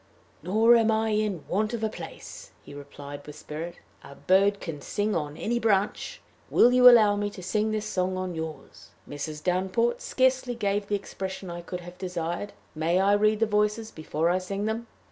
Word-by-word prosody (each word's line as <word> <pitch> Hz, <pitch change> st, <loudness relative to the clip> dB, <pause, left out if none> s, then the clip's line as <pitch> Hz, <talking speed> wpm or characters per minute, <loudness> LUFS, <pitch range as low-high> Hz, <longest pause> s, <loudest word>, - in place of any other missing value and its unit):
"Nor 220 Hz, +7 st, +5 dB
am 225 Hz, -1 st, +2 dB
I 220 Hz, 0 st, +1 dB
in 210 Hz, -6 st, -1 dB
want 215 Hz, +5 st, 0 dB
of 225 Hz, -, -5 dB
a -, -, +3 dB
place," 215 Hz, -, -9 dB
he -, -, -12 dB
replied, 145 Hz, 0 st, -10 dB
with 150 Hz, -, -9 dB
spirit; 160 Hz, +3 st, -7 dB, 0.3 s
"a 140 Hz, -, -12 dB
bird 195 Hz, +5 st, +3 dB
can 155 Hz, -4 st, -6 dB
sing 205 Hz, +8 st, -1 dB
on 150 Hz, -2 st, -3 dB
any 235 Hz, +2 st, -1 dB
branch. 215 Hz, -, 0 dB, 0.3 s
Will 245 Hz, -, +5 dB
you 250 Hz, 0 st, +9 dB
allow 215 Hz, -4 st, +6 dB
me 205 Hz, 0 st, -1 dB
to 190 Hz, -3 st, -11 dB
sing 215 Hz, +4 st, 0 dB
this 215 Hz, -1 st, -2 dB
song 185 Hz, -2 st, -1 dB
on 185 Hz, -1 st, -3 dB
yours? 160 Hz, -2 st, -8 dB, 0.2 s
Mrs. 150 Hz, +1 st, -6 dB
Downport 190 Hz, +6 st, 0 dB
scarcely 260 Hz, -1 st, +1 dB
gave 205 Hz, -2 st, -1 dB
the 205 Hz, -, 0 dB
expression 190 Hz, -2 st, -6 dB
I 175 Hz, 0 st, -6 dB
could 180 Hz, +1 st, -6 dB
have 175 Hz, +1 st, -12 dB
desired. 180 Hz, +2 st, -4 dB, 0.2 s
May 165 Hz, +3 st, +1 dB
I 195 Hz, +1 st, +4 dB
read 215 Hz, +1 st, +2 dB
the -, -, +5 dB
voices 210 Hz, +1 st, 0 dB
before 155 Hz, +1 st, -1 dB
I 185 Hz, -, +1 dB
sing 195 Hz, +2 st, -4 dB
them?" 225 Hz, +2 st, -3 dB
200 Hz, 190 wpm, -27 LUFS, 175-215 Hz, 0.3 s, you